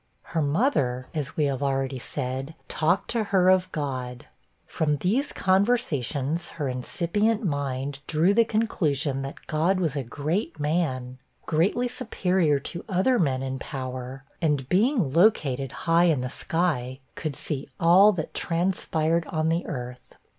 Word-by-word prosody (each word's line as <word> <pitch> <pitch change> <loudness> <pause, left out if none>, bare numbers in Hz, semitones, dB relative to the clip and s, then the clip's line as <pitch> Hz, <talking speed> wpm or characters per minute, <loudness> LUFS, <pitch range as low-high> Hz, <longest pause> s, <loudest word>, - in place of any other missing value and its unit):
Her 165 - -2
mother, 140 - +1
as 150 -4 -4
we 150 - +3
have 140 -2 -1
already 135 -1 -1
said, 135 +4 -4
talked 165 +4 +1
to 230 -2 0
her 185 -2 +3
of 185 0 +2
God. 130 -4 -4 0.4
From 150 -2 0
these 225 - 0
conversations, 170 - +1
her 145 -4 -1
incipient 190 - 0
mind 140 -3 -2
drew 165 +5 +3
the 230 +2 +5
conclusion, 155 - 0
that 135 0 -7
God 170 +5 +1
was 160 -6 0
'a 140 - 0
great 155 - -3
man'; 130 -5 -1 0.3
greatly 185 +10 +1
superior 185 - +1
to 170 +4 -6
other 195 +7 +2
men 135 -6 +1
in 135 0 -3
power; 130 0 -6 0.2
and 145 -5 +1
being 205 - +2
located 140 - +3
'high 170 +1 +2
in 155 -7 +2
the 125 - -3
sky,' 135 -5 -1
could 155 -4 -4
see 140 0 -4
all 185 +5 +7
that 165 -6 -4
transpired 165 -2 0
on 155 0 0
the 165 +2 0
earth. 125 -5 -7
155 Hz, 145 wpm, -26 LUFS, 135-180 Hz, 0.4 s, all